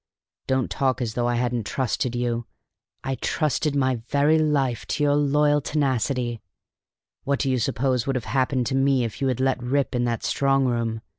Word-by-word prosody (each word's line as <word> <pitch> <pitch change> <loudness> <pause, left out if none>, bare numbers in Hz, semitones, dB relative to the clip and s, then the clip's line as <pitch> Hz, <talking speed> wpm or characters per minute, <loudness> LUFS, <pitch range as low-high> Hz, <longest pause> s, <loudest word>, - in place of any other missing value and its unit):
Don't 130 -2 0
talk 130 -2 0
as 115 -4 -2
though 120 +1 0
I 120 - +1
hadn't 120 -3 -1
trusted 125 0 -1
you! 120 -1 -2 0.6
I 135 - -2
trusted 150 +1 -1
my 130 -2 +1
very 145 +3 +3
life 140 -6 0
to 150 - -1
your 145 -1 +3
loyal 145 0 +3
tenacity. 130 -5 -1 0.8
What 140 0 0
do 135 -1 0
you 130 - +1
suppose 125 +2 0
would 135 - 0
have 125 - -2
happened 130 -1 0
to 130 - -1
me 135 -1 +3
if 115 +3 -5
you 135 - +2
had 130 -2 -1
let 130 -1 +1
me 120 - -6
rip 140 +1 0
in 120 -1 0
that 115 -1 -2
strong 135 -1 +2
room? 115 -2 -1
130 Hz, 195 wpm, -24 LUFS, 120-140 Hz, 0.8 s, very